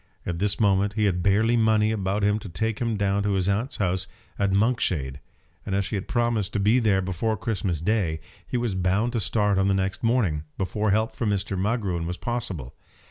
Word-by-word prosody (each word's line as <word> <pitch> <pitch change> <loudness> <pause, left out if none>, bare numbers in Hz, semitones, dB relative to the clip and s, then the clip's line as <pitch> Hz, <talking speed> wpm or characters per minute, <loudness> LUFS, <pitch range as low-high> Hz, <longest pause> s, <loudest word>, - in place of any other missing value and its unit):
At 85 -1 -3
this 100 +1 0
moment 100 -1 +2
he 110 0 0
had 90 -4 +1
barely 105 +5 +3
money 110 -1 +3
about 100 -1 -1
him 105 +1 +2
to 105 - -9
take 110 +6 -2
him 115 -3 -1
down 100 0 +1
to 100 0 0
his 95 -1 +1
aunt's 105 +7 -1
house 95 -1 0 0.3
at 100 -1 +2
Monkshade, 95 - +1 0.4
and 95 - -2
as 100 0 0
he - - -2
had 95 - -4
promised 120 -4 0
to - - 0
be 105 +5 +4
there 100 -5 +2
before 95 +5 -1
Christmas 95 -8 -2
Day, 85 -5 0 0.3
he 125 - -1
was 120 -4 -1
bound 95 +6 +1
to 120 - 0
start 105 -1 +1
on 95 - +2
the 100 - +3
next 95 0 -1
morning, 110 -11 +1
before 105 +3 -1
help 110 +3 +1
from 115 - -1
Mr. 100 0 -1
Magruin 95 -4 -1
was 90 +1 -4
possible. 95 - -4
100 Hz, 210 wpm, -25 LUFS, 95-110 Hz, 0.4 s, be